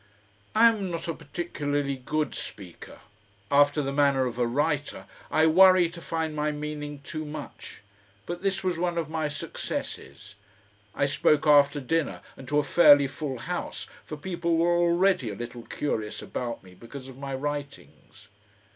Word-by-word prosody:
I 230 +2 +7
am 205 -4 -2
not 170 -1 -4
a 165 - -1
particularly 145 -3 -3
good 150 +4 -2
speaker; 90 -4 -9 0.5
after 145 +1 +4
the 135 0 -3
manner 140 -2 +3
of 125 -1 -4
a 120 - +2
writer 145 +3 -1 0.2
I 160 - +3
worry 185 +1 +6
to 170 0 -10
find 160 -1 -3
my 150 0 0
meaning 150 -1 -6
too 155 +1 -5
much; 150 -7 -9 0.4
but 175 0 -5
this 195 -1 -1
was 180 -3 -1
one 175 -1 -1
of 160 -2 -2
my 160 -1 -1
successes. 105 - -6 0.6
I - - +2
spoke 145 +2 +2
after 145 -1 +5
dinner 160 +3 -1
and 130 - -12
to 145 - 0
a 150 - +3
fairly 145 -1 +6
full 140 -1 -4
House, - - -5 0.2
for 155 - -7
people 170 +1 -1
were 170 +1 +3
already 175 - +2
a 100 - -5
little 120 +2 -7
curious 110 -7 -3
about 120 -4 -5
me 90 -1 -15
because 130 +7 -10
of 130 0 -12
my 135 -1 -4
writings. 145 -7 -7
150 Hz, 165 wpm, -27 LUFS, 135-165 Hz, 0.6 s, I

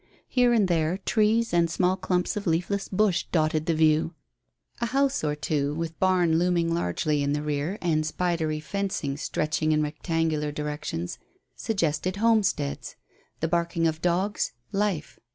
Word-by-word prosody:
Here 245 -1 +3
and 220 -5 +3
there 165 0 +1
trees 220 +2 +1
and 170 -1 +3
small 180 +2 +2
clumps 185 +1 -1
of 205 -1 -4
leafless 180 +4 0
bush 190 -2 +1
dotted 155 -1 +1
the 165 - +2
view. 155 +1 +2 0.6
A 235 - 0
house 275 - +1
or 150 -1 0
two, 150 -1 -1
with 165 0 -4
barn 180 -3 +3
looming 170 -1 +1
largely 150 - 0
in 140 0 0
the 150 0 -1
rear, 150 +6 -2
and 155 -3 +2
spidery 160 -1 -1
fencing, 155 -3 -2
stretching 155 +1 -1
in 155 0 +2
rectangular 155 0 -1
directions, 150 - -4 0.4
suggested 180 -3 -1
homesteads; 205 -10 +1 0.5
the 160 - +1
barking 170 0 0
of 160 0 0
dogs 185 +4 0 0.2
life. 195 -6 -1
165 Hz, 150 wpm, -26 LUFS, 155-190 Hz, 0.6 s, Here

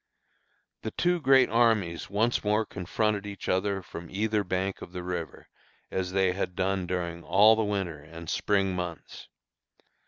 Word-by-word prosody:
The 110 - -3
two 175 +8 0
great 135 -3 +5
armies 110 -8 +2
once 110 +4 +1
more 105 +1 +2
confronted 105 +2 -1
each 100 -1 -7
other 95 +1 0
from 85 -1 -9
either 105 +1 0
bank 95 +1 -2
of 90 - -9
the 90 -1 -5
river, 90 -2 -5 0.4
as 95 -1 -2
they 95 -1 +2
had 90 -1 -3
done 95 -1 0
during 85 -2 -3
all 105 +3 +6
the 110 - +1
winter 95 -7 -2
and 80 +2 -11
spring 95 0 +1
months. 90 -2 -6
95 Hz, 155 wpm, -28 LUFS, 90-105 Hz, 0.4 s, all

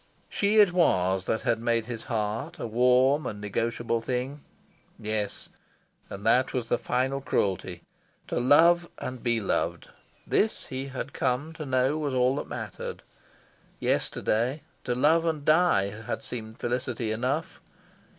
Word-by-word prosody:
She 205 +2 +1
it 205 -4 +6
was 95 - +2
that 110 - 0
had 120 -3 +1
made 115 -1 +1
his 120 -2 -6
heart 110 -2 -2
a - - -4
warm 125 +5 +3
and 105 - -5
negotiable 115 +3 -1
thing. 130 +4 -3 0.6
Yes, 105 -1 -3 0.6
and 100 +2 -8
that 125 +3 +3
was 120 -3 -2
the 120 - +2
final 130 +2 0
cruelty. 95 -8 -1 0.5
To - - 0
love 170 +7 +5
and 130 -1 -5
be 120 -2 +1
loved 100 - -1 0.4
this, 215 - +1
he 135 -1 -5
had 135 +1 -6
come 135 +5 -1
to 155 -2 -7
know, 130 +3 +2
was 145 -4 -2
all 130 +2 +3
that - - -4
mattered. - - -6 0.8
Yesterday, 125 +7 0 0.2
to 125 - 0
love 155 +6 +4
and 160 -3 -1
die 155 - +4
had 105 +2 -5
seemed 110 -2 -6
felicity 120 -2 -2
enough. 135 +10 -2
125 Hz, 145 wpm, -27 LUFS, 115-145 Hz, 0.8 s, it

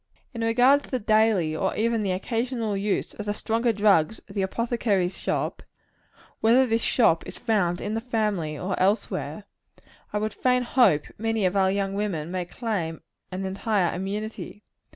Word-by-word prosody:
In 230 - -5
regard 245 +5 +4
to - - -15
the 255 - 0
daily, 215 -7 +2
or 190 +4 -1
even 230 0 +1
the 200 - -1
occasional 225 +2 -2
use 200 +1 -1
of 210 - -7
the 205 - -1
stronger 230 +2 0
drugs 205 -3 +3
of 195 - -12
the 200 - -1
apothecary's 200 -3 0
shop - - -2 0.8
whether 240 +4 +5
this 230 -1 0
shop 195 -11 +3
is - - -8
found 200 -7 0
in 205 - -3
the 225 - -1
family 210 -10 -1
or 185 +3 -2
elsewhere 200 +4 0 0.7
I - - -1
would 215 0 -2
fain 250 -1 +2
hope 225 - +3
many 225 -2 0
of 185 +1 +1
our 190 -1 +3
young 195 0 -1
women 185 -6 -2
may 180 -1 -2
claim 175 -4 -3 0.3
an 190 +1 -4
entire 195 -1 0
immunity. 205 +3 -5
210 Hz, 170 wpm, -25 LUFS, 190-225 Hz, 0.8 s, whether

